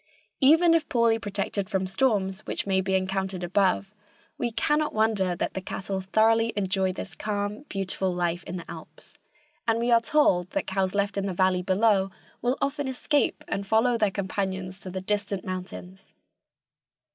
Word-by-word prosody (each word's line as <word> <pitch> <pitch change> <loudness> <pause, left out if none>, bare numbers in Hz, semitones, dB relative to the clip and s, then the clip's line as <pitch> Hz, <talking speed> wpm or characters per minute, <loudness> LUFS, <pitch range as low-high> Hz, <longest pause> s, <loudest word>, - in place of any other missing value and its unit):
Even 325 +5 +6
if 325 -3 +1
poorly 230 -2 +3
protected 200 -1 -3
from 190 -3 0
storms 195 -2 +1
which - - -2
may 190 -1 +2
be 190 0 0
encountered 190 -1 -1
above, 195 +2 +1 0.4
we 240 - -1
cannot 295 +5 0
wonder 215 -5 +2
that - - -2
the 190 - -4
cattle 190 +1 -4
thoroughly 225 +4 +3
enjoy 190 -1 0
this 185 - -7
calm, 210 +4 -3
beautiful 190 -1 -2
life 175 -1 -1
in - - -5
the 170 - -8
alps, - - -12 0.5
and 225 0 +3
we 235 +1 0
are 230 -1 +6
told 190 - +2
that - - -1
cows 190 0 -1
left 200 0 0
in 200 - -2
the 185 - -3
valley 185 0 +2
below 195 +1 +2 0.3
will 245 +2 +1
often 280 0 -1
escape 265 +1 0
and 195 0 -3
follow 225 +4 +3
their 215 -3 +2
companions 190 -1 -3
to 190 - -8
the 185 +1 -4
distant 205 0 -2
mountains. 185 +1 -7
195 Hz, 170 wpm, -26 LUFS, 190-225 Hz, 0.5 s, Even